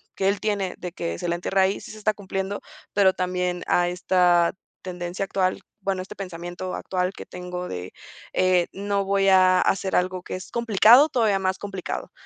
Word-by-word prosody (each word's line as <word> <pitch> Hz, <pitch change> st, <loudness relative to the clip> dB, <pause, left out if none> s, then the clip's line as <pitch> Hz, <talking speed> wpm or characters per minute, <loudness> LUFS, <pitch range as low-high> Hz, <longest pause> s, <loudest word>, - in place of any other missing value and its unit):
que 190 Hz, -, 0 dB
él 200 Hz, +1 st, +1 dB
tiene 200 Hz, -4 st, -1 dB
de 180 Hz, -, -6 dB
que 85 Hz, -, -4 dB
se -, -, -4 dB
le -, -, +1 dB
entierre 190 Hz, +2 st, 0 dB
ahí 190 Hz, +1 st, +2 dB
sí -, -, -10 dB
se 220 Hz, -, -10 dB
está 215 Hz, 0 st, +1 dB
cumpliendo, 195 Hz, 0 st, -4 dB, 0.3 s
pero 195 Hz, -2 st, +4 dB
también 180 Hz, -1 st, -2 dB
a 175 Hz, 0 st, +2 dB
esta 180 Hz, -1 st, +3 dB, 0.3 s
tendencia 180 Hz, +1 st, -4 dB
actual, 185 Hz, -1 st, 0 dB, 0.2 s
bueno, 190 Hz, -1 st, -1 dB
este 185 Hz, -, -11 dB
pensamiento 180 Hz, -1 st, -6 dB
actual 180 Hz, 0 st, -2 dB
que -, -, -9 dB
tengo 180 Hz, 0 st, -6 dB
de 90 Hz, 0 st, -6 dB, 0.4 s
eh, 185 Hz, -2 st, +3 dB
no 200 Hz, 0 st, -1 dB
voy 195 Hz, 0 st, +2 dB
a 185 Hz, -1 st, +5 dB
hacer 195 Hz, 0 st, 0 dB
algo 185 Hz, 0 st, 0 dB
que -, -, -6 dB
es 185 Hz, -, -9 dB
complicado, 235 Hz, -, +6 dB
todavía 220 Hz, -7 st, +2 dB
más 190 Hz, 0 st, 0 dB
complicado. 195 Hz, -2 st, -5 dB
185 Hz, 185 wpm, -24 LUFS, 180-195 Hz, 0.4 s, complicado